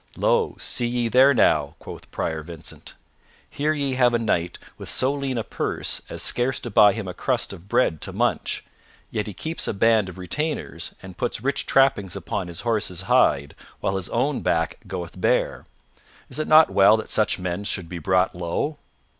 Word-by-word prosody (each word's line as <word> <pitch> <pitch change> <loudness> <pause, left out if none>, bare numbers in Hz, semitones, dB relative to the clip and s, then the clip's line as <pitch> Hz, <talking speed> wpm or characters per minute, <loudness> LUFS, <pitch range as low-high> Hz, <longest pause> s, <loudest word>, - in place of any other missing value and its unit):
"Lo, - - +2
see 120 - +1
ye 120 0 0
there 130 +4 +6
now," 75 - +2
quoth - - -11
Prior 80 -1 -3
Vincent. 80 0 -9 0.5
"Here 150 +2 -1
ye 140 -3 -1
have 125 -2 +3
a - - +4
knight 90 -7 -1 0.2
with - - -8
so 130 +2 +2
lean 135 -3 -3
a 115 - -1
purse - - -2
as - - -1
scarce 125 +2 +1
to 120 - -6
buy 105 0 +6
him 110 -4 -5
a 90 - -5
crust - - -1
of 90 +4 -13
bread 80 - +2
to - - -4
munch, - - -1 0.5
yet 105 -1 -2
he 105 - -6
keeps 160 - -3
a - - -2
band 110 -1 +3
of 90 - -11
retainers 150 - -4
and 95 -2 -10
puts 120 -2 -2
rich 140 +1 -1
trappings 125 -9 +3
upon 90 - -4
his 85 -1 -6
horse's 105 -6 -2
hide, 70 -6 +3 0.3
while 95 - -1
his 95 -2 -3
own 135 +4 0
back 80 0 0
goeth 90 -1 -6
bare. - - +1 0.6
Is - - -3
it 155 - -1
not 155 +1 +7
well 100 +3 +6
that 110 - -6
such 110 - +2
men 90 +1 -3
should 95 -4 -2
be 90 0 -6
brought 95 +3 +2
low?" 90 - -3
105 Hz, 190 wpm, -23 LUFS, 90-130 Hz, 0.6 s, not